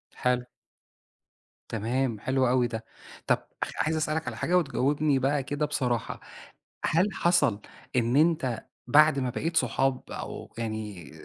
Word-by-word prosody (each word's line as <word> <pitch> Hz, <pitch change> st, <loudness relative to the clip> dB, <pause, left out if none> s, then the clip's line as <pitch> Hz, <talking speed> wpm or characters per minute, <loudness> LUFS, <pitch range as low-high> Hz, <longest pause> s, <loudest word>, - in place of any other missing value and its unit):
حلو. 125 Hz, 0 st, +1 dB, 1.2 s
تمام 115 Hz, +1 st, -1 dB
حلو 130 Hz, +1 st, +1 dB
أوي 125 Hz, -1 st, +3 dB
ده. 115 Hz, -1 st, -6 dB, 0.4 s
طب -, -, +4 dB, 0.3 s
خ -, -, -5 dB
عايز 155 Hz, +1 st, +1 dB
أسألك 155 Hz, +1 st, -1 dB
على -, -, -4 dB
حاجة 180 Hz, +1 st, +2 dB
وتجاوبني 145 Hz, -1 st, +2 dB
بقى 140 Hz, +2 st, +1 dB
كده 145 Hz, +3 st, -1 dB
بصراحة، 125 Hz, -6 st, -1 dB, 0.7 s
هل 175 Hz, +5 st, +3 dB
حصل 170 Hz, -, +3 dB, 0.4 s
إن 120 Hz, +1 st, +2 dB
أنت 155 Hz, -7 st, +2 dB, 0.2 s
بعد 150 Hz, +2 st, +6 dB
ما 130 Hz, -, -1 dB
بقيت 165 Hz, +7 st, -2 dB
صحاب 130 Hz, 0 st, +1 dB
أو -, -, -7 dB
يعني 105 Hz, -, -5 dB
130 Hz, 135 wpm, -28 LUFS, 120-150 Hz, 1.2 s, بعد